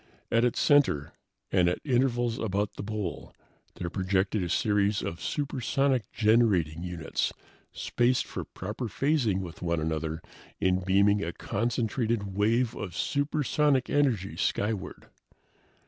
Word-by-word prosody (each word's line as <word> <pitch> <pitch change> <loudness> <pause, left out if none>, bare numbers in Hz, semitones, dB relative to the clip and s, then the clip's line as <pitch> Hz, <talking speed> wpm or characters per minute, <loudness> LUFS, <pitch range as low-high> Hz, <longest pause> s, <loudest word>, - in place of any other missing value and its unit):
At 115 0 +3
its 125 - +1
center, 140 - +3 0.4
and 90 -2 +4
at 90 - -1
intervals 120 -2 +1
about 100 -1 -1
the - - -7
bowl, 105 -3 -5 0.4
there 85 -1 -4
projected 95 +1 0
a 90 - -2
series 105 +1 +1
of 85 - -5
supersonic 135 - 0
generating 105 -8 +2
units, 85 -2 -2 0.4
spaced 120 +1 +1
for - - -5
proper 105 +7 -6
phasing 120 -4 +1
with 85 -3 -8
one 85 -2 0
another 80 +1 -2 0.4
in 95 0 +2
beaming 100 +2 +3
a 85 - -2
concentrated 115 -1 -1
wave 115 +4 +2
of 90 -4 -6
supersonic 145 - +1
energy 125 -10 +1
skyward. 105 -2 -2
105 Hz, 125 wpm, -28 LUFS, 90-120 Hz, 0.4 s, and